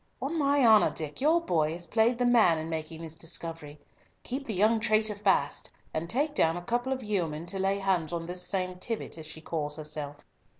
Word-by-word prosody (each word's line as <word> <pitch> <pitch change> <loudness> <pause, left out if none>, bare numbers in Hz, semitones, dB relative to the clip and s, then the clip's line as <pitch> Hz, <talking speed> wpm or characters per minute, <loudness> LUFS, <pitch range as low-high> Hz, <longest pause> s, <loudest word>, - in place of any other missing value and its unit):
On 280 +5 -3
my 285 -3 +3
honour, 220 -2 +7
Dick, 155 - -5
your 315 +4 +4
boy 160 - +1
has 175 +1 -6
played 225 +6 +2
the 245 - +1
man 225 -9 +5
in 160 +1 -4
making 160 +1 -5
this 160 -1 -5
discovery. 165 -2 -6 0.4
Keep 275 +3 -4
the 220 - -2
young 215 +4 +3
traitor 215 0 +2
fast, 195 -8 0 0.2
and 165 +2 -3
take 290 - +1
down 165 - +2
a - - -5
couple 245 +6 -1
of 260 -1 -2
yeomen 170 -7 -2
to 190 +2 -3
lay 195 +1 +1
hands 190 -5 0
on 170 -1 -3
this 180 +1 -3
same 185 0 -2
Tibbott 225 -5 -4
as 155 - -8
she 160 +1 -8
calls 150 -2 -2
herself." 150 -1 -5
180 Hz, 210 wpm, -29 LUFS, 160-225 Hz, 0.4 s, honour